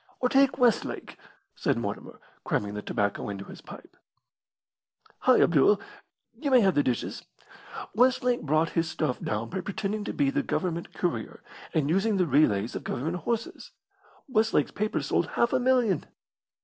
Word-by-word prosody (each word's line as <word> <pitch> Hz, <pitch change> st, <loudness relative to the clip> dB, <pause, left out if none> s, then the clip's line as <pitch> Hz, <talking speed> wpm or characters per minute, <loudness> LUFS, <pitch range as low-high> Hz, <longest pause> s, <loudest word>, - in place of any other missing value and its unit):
"Or 250 Hz, -, +1 dB
take 275 Hz, +1 st, +4 dB
Westlake," 245 Hz, -4 st, +1 dB, 0.4 s
said -, -, 0 dB
Mortimer, -, -, -5 dB, 0.2 s
cramming 105 Hz, 0 st, -1 dB
the 105 Hz, -, -4 dB
tobacco 100 Hz, 0 st, -2 dB
into 100 Hz, -1 st, -6 dB
his -, -, -11 dB
pipe. -, -, -13 dB, 1.2 s
"Hi, -, -, +4 dB
Abdul, 175 Hz, +5 st, +4 dB, 0.6 s
you 290 Hz, -, -1 dB
may 255 Hz, -2 st, +6 dB
have 195 Hz, -3 st, +3 dB
the 145 Hz, -, +3 dB
dishes! 125 Hz, -4 st, -2 dB, 0.7 s
Westlake 250 Hz, +1 st, +2 dB
brought 155 Hz, +2 st, +1 dB
his 165 Hz, -1 st, 0 dB
stuff 150 Hz, -6 st, -2 dB
down 110 Hz, +2 st, -3 dB
by 190 Hz, +1 st, -3 dB
pretending 205 Hz, +2 st, -3 dB
to -, -, -2 dB
be 280 Hz, -1 st, +1 dB
the 285 Hz, +1 st, 0 dB
Government 170 Hz, -9 st, -3 dB
courier, 165 Hz, -11 st, -3 dB, 0.3 s
and 150 Hz, -3 st, +1 dB
using 195 Hz, +6 st, +1 dB
the 180 Hz, -, +3 dB
relays 125 Hz, -8 st, +2 dB
of -, -, -5 dB
Government 160 Hz, +8 st, -3 dB
horses. 230 Hz, +5 st, -4 dB, 0.5 s
Westlake's 220 Hz, -, +2 dB
paper 215 Hz, +1 st, -2 dB
sold -, -, 0 dB
half 235 Hz, -, 0 dB
a -, -, +3 dB
million." 245 Hz, -, +2 dB
190 Hz, 155 wpm, -27 LUFS, 145-235 Hz, 1.2 s, may